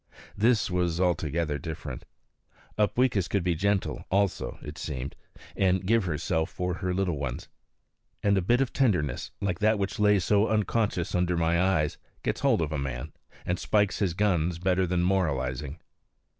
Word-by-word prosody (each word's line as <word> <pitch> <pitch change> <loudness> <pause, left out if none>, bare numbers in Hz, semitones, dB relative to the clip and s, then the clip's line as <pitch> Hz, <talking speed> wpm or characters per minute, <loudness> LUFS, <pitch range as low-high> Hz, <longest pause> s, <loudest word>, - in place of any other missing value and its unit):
This 110 -1 +2
was 90 -2 0
altogether 85 -4 0
different. 80 -3 -6 0.7
Upweekis 105 -2 +2
could 100 -3 0
be 90 -1 +1
gentle 100 +4 0
also, 100 -1 0
it 75 +2 -8
seemed, 70 -4 -5 0.4
and 95 -1 +2
give 115 0 +3
herself 80 0 -1
for 90 0 -2
her 90 +1 -2
little 90 -5 0
ones. 65 -3 -4 0.7
And 100 -1 +4
a 95 - +2
bit 120 +8 +2
of 135 - -1
tenderness, 90 - +1
like 95 -3 -1
that 110 +1 +3
which 100 +3 -3
lay 105 -1 +5
so 100 +4 +2
unconscious 105 -4 0
under 90 -1 +1
my 85 +1 +2
eyes, 85 -6 +1 0.2
gets - - -1
hold - - +3
of 75 - -3
a 75 - -2
man, 65 -3 -4 0.3
and 90 0 -1
spikes 105 -2 +1
his 90 -5 0
guns 90 -4 +1
better 90 +1 +1
than 90 0 +1
moralizing. 75 -5 -1
90 Hz, 160 wpm, -27 LUFS, 80-100 Hz, 0.7 s, lay